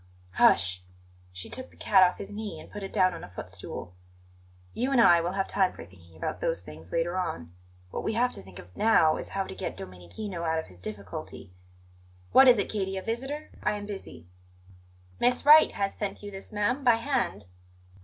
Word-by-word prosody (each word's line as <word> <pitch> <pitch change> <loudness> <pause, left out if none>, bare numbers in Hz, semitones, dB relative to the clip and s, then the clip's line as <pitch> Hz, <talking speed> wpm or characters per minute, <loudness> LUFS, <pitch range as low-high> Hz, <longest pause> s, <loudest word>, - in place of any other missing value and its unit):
"Hush!" 90 0 +4 0.5
She 90 0 -7
took 260 - -7
the - - -21
cat 195 -2 +4
off 180 -1 +5
his 195 - -7
knee 210 0 -6
and - - -13
put 205 - -7
it 195 - -6
down 185 -1 +3
on 170 - -8
a - - -9
footstool. 90 0 -6 0.8
"You 255 +4 -1
and 270 - +4
I 175 -7 +7
will 175 +2 -2
have 195 0 -1
time 190 -2 +1
for - - -10
thinking 85 -3 -18
about - - -4
those - - -1
things 80 +1 -12
later 175 +2 0
on. 125 - -4 0.4
What - - -4
we 220 - -1
have 245 +2 +2
to - - -7
think 95 -1 -14
of 90 +1 -13
now 165 -8 +4
is - - -6
how 195 - -1
to - - -8
get - - -5
Domenichino 95 - -7
out 160 -1 0
of 160 - -2
his 90 -1 -16
difficulty. 100 -2 -8 0.8
What 265 - +8
is 245 -2 +8
it, 200 - 0
Katie; 195 -2 -2
a 190 - -4
visitor? 270 +7 -4
I - - +1
am 205 -1 -5
busy." 195 - -8 0.9
"Miss 245 +2 +2
Wright 305 +1 +8
has 195 -1 -1
sent 205 -1 -5
you 205 - -7
this, 195 +2 -9
ma'am, 220 +6 0
by 240 -3 +6
hand." 235 - -1
190 Hz, 205 wpm, -28 LUFS, -, 0.9 s, What